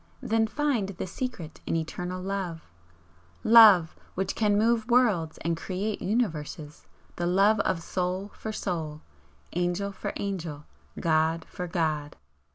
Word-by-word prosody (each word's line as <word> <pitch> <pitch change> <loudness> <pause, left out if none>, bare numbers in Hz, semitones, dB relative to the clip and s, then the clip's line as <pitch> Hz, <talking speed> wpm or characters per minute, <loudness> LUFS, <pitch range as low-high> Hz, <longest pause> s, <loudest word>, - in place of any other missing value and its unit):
Then 225 0 +2
find 270 -5 0
the 190 -2 -5
secret 185 -5 -6
in - - 0
Eternal 180 +3 -3
Love! 190 -4 -3 0.8
'Love, 215 -8 +8 0.2
which 190 +1 -1
can 210 -2 +2
move 225 +1 +2
worlds 210 -11 +3
and 170 0 +1
create 195 +5 -3
universes, 160 -8 -2 0.3
the 175 - -1
love 200 +4 +4
of 185 -4 0
soul 185 +3 -2
for 220 - -6
soul, 160 -7 -4 0.5
angel 175 +3 -1
for 195 - -5
angel, 165 -7 -4 0.3
god 160 0 +1
for 180 - -6
god!" 155 -4 -1
185 Hz, 130 wpm, -27 LUFS, 165-210 Hz, 0.8 s, Love